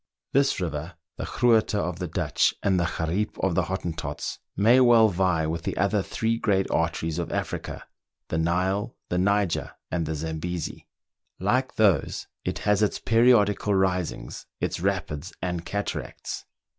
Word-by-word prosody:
This 140 -2 +3
river, 80 -1 -4 0.2
the - - -3
Groote 115 -3 +3
of 90 -3 -2
the 90 - -2
Dutch, 75 - +1
and 95 -2 +3
the 85 - +1
Gariep 90 +5 -1
of 95 - 0
the - - +1
Hottentots, 80 -5 -4 0.2
may 115 +6 +6
well 120 -3 +6
vie 90 -4 +1
with 80 +1 -2
the - - -3
other 100 +2 +2
three 115 +4 -1
great 95 -4 +2
arteries 80 0 0
of 85 - -3
Africa - - -3 0.2
— - - -61
the 80 - 0
Nile, 95 +7 0
the 90 - 0
Niger, 100 -1 +1 0.2
and 85 -3 -1
the 80 - -2
Zambesi. 80 +2 -4 0.5
Like 125 +8 0
those, 100 -9 +2 0.2
it - - -2
has 105 0 +3
its 105 - +2
periodical 105 -3 +4
risings, 90 -2 -1
its - - -2
rapids 90 -3 -2
and 90 -2 -2
cataracts. 100 0 -4
95 Hz, 155 wpm, -26 LUFS, 85-105 Hz, 0.5 s, may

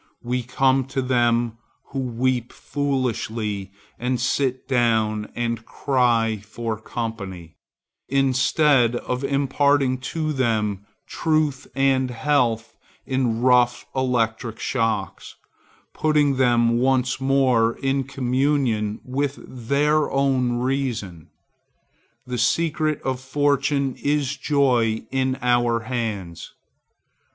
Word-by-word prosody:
We 125 +1 -1
come 130 +2 +1
to 135 0 -2
them 120 -2 +1 0.3
who 135 - -4
weep 125 -1 -1
foolishly 115 -8 -2 0.3
and 125 +1 -1
sit 130 +1 -1
down 110 -4 +1
and 115 -1 -2
cry 115 -5 +1
for 115 +1 -4
company, 100 -8 -6 0.5
instead 135 -1 +3
of 125 +2 -3
imparting 140 -1 +2
to 155 +4 -3
them 105 -6 -1 0.2
truth 155 -4 0
and 135 -1 +2
health 120 -2 0 0.3
in 125 -3 0
rough 125 -1 +3
electric 115 -3 -1
shocks, 115 -6 -2 0.6
putting 150 -3 +2
them 120 -2 +3
once 130 0 +1
more 130 -4 +3
in 135 0 -1
communication 130 -5 0
with 140 +2 -2
their 145 +5 +1
own 135 -3 +1
reason. 120 - -2 1.0
The 125 -1 -4
secret 155 +5 +1
of 130 -1 -2
fortune 140 0 0
is 140 -1 0
joy 125 -8 +1
in 130 0 0
our 120 -1 +2
hands. 110 -8 -4
125 Hz, 100 wpm, -23 LUFS, 115-135 Hz, 1.0 s, instead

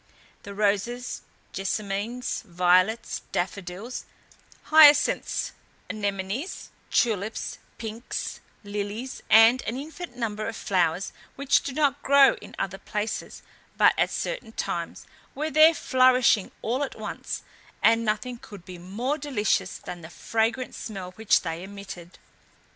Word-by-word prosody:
The 200 - -9
roses, 210 +5 0 0.3
jessamines, 205 +5 -2
violets, 185 +3 +2
daffodils, 190 +5 -4 0.7
hyacinths, 300 -2 +6 0.4
anemonies, 205 - -3 0.2
tulips, 220 -2 0 0.2
pinks, 225 +1 -5 0.2
lilies, 205 +5 -5
and 225 +4 +7
an 230 - -2
infinite 320 +5 -7
number 215 -3 -3
of 230 - -4
flowers, 180 -2 0 0.2
which 280 0 +3
do 280 - -4
not 285 -1 +1
grow 280 0 +6
in - - -11
other 195 0 -3
places 210 +1 -4 0.3
but - - +6
at - - +2
certain - - -4
times, - - -4 0.3
were 310 +2 -2
there 315 +3 +7
flourishing 255 -6 +4
all 245 +5 0
at 280 - -5
once, - - -5 0.4
and 230 +1 +5
nothing 225 +3 -2
could 200 -6 -12
be 180 -1 -9
more 235 - -3
delicious 210 -9 0
than 175 -1 -8
the 160 - -10
fragrant 230 +7 -1
smell 190 -4 -6
which 220 +3 +2
they 165 -1 -4
emitted. 190 -3 -9
220 Hz, 120 wpm, -26 LUFS, 195-255 Hz, 0.7 s, and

